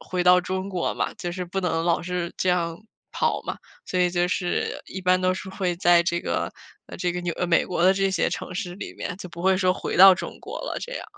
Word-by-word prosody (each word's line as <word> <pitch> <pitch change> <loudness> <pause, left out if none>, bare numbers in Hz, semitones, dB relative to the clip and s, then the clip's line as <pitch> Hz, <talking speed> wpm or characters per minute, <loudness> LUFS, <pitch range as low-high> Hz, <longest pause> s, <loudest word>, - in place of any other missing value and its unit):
回 180 -1 -2
到 180 0 +6
中 185 +1 -3
国 185 -3 -1
嘛， - - -2
就 175 -1 -5
是 180 0 -4
不 195 +2 -3
能 165 -2 0
老 170 -1 +1
是 175 0 -3
这 185 - +1
样 170 -2 0 0.3
跑 - - 0
嘛。 - - -4 0.3
所 185 - -2
以 180 -1 +3
就 175 0 +1
是 180 -1 -1
一 190 - -6
般 185 0 +3
都 185 0 +2
是 190 +1 -6
会 185 -2 -2
在 175 -2 +5
这 170 0 -1
个， - - -2 0.3
呃， - - -9
这 180 0 0
个 180 +1 -3
纽 175 -1 -1
呃， 180 - 0
美 170 - +3
国 175 -2 -2
的 190 +1 +6
这 195 0 +1
些 185 - +1
城 180 - -5
市 180 -2 -4
里 - - -7
面， 180 - -5
就 185 -1 -8
不 170 - -9
会 190 0 +4
说 185 -1 +3
回 - - -4
到 190 +1 +10
中 185 - -7
国 - - -7
了 - - -4
这 - - -6
样。 - - -5
180 Hz, 280 characters per minute, -24 LUFS, 175-185 Hz, 0.3 s, 到